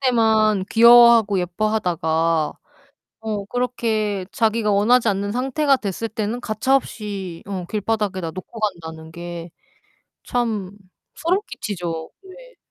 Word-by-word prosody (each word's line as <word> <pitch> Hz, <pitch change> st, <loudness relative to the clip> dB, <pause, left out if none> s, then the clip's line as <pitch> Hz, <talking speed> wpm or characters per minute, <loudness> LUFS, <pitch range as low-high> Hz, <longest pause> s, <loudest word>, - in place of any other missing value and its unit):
때만 220 Hz, -6 st, +3 dB
귀여워하고 235 Hz, -3 st, +7 dB
예뻐하다가 170 Hz, -5 st, 0 dB, 0.7 s
어 210 Hz, -3 st, -3 dB
그렇게 220 Hz, -5 st, -1 dB
자기가 225 Hz, -1 st, +1 dB
원하지 230 Hz, +4 st, +3 dB
않는 205 Hz, 0 st, 0 dB
상태가 270 Hz, +3 st, +1 dB
됐을 215 Hz, +2 st, -4 dB
때는 220 Hz, +2 st, -3 dB
가차 220 Hz, +5 st, +1 dB
없이 200 Hz, -9 st, -4 dB
어 190 Hz, -3 st, -4 dB
길바닥에다 205 Hz, -5 st, -2 dB
놓고 190 Hz, +5 st, -9 dB
간다는 160 Hz, -6 st, -4 dB
게 170 Hz, 0 st, -7 dB, 0.8 s
참 220 Hz, -6 st, -1 dB, 0.4 s
소름 355 Hz, +4 st, +1 dB
끼치죠. 170 Hz, -5 st, -5 dB
왜 -, -, -14 dB
215 Hz, 255 characters per minute, -21 LUFS, 185-235 Hz, 0.8 s, 귀여워하고